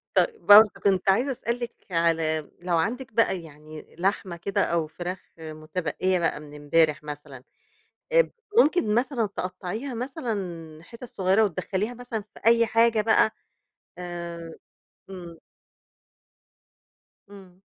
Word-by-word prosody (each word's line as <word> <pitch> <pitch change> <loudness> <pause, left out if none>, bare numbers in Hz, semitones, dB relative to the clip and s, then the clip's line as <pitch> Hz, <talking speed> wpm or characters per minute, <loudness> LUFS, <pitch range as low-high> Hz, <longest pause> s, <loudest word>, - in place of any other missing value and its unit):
طيب، 455 -3 +1
برضو 210 +1 +9
كنت 195 -1 +2
عايزة 240 +9 +3
أسألِك 240 -1 -3 0.2
على 165 -2 +1
لو 175 -1 0
عندِك 245 +9 -2
بقى 205 -5 +2
يعني 155 -1 -13
لحمة 190 -1 -1
كده 200 +4 -1
أو 165 -2 0
فراخ 175 +4 -6 0.2
متبقيّة 160 +3 -2
بقى 165 -3 0
من 150 0 -12
امبارح 150 +1 +2
مثلًا، 145 -3 -9 0.7
آآ - - +6
ب - - -7 0.3
ممكن 295 - +3
مثلًا 245 -1 +1
تقطعيها 200 +6 -5
مثلًا 200 - -5
حتت 230 +7 -11
صغيرة 195 -1 +2
وتدخليها 195 +4 -2
مثلًا 245 -2 -5
في 205 - -22 0.2
أي 230 0 +5
حاجة 225 -1 +3
بقى؟ 220 0 +4 0.7
آآ، 170 -2 -7 0.6
امم. 175 -3 -9 1.9
امم. 190 -2 -15
185 Hz, 120 wpm, -25 LUFS, 165-225 Hz, 1.9 s, برضو